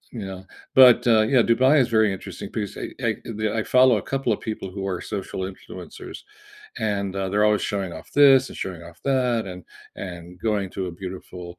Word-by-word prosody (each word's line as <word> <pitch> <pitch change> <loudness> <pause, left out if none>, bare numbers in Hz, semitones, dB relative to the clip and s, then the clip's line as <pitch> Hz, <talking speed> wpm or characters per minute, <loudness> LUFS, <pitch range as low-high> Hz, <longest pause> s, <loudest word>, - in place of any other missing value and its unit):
you 105 -4 -5
know? 95 0 -8 0.3
But, 125 -2 +7
uh, 110 -2 +5
yeah, 120 +3 +4
Dubai 130 +6 +4
is 125 - +3
a - - -14
very 110 -2 +3
interesting 95 +1 -8
piece. 105 -3 -4
I - - -3 0.2
I - - +1 0.2
the, 110 - +1
uh - - -3
I - - -1
follow 125 -2 +6
a - - -3
couple 135 -3 0
of - - -4
people 110 -3 -4
who 95 -1 -5
are 90 - -4
social 95 -1 -5
influencers, 95 - -10 0.6
and, 100 -2 -1
uh, 95 0 -1
they're 105 +2 +2
always 105 -1 +2
showing 100 -3 -2
off - - -11
this 135 -2 +8
and - - -10
showing 90 -3 -7
off 85 0 -15
that 125 -4 +1
and- 90 - -8 0.5
and 85 -2 -8 0.2
going 105 -3 0
to 95 - -4
a 90 - -5
beautiful, 90 -1 -7
105 Hz, 215 wpm, -23 LUFS, 95-120 Hz, 0.6 s, this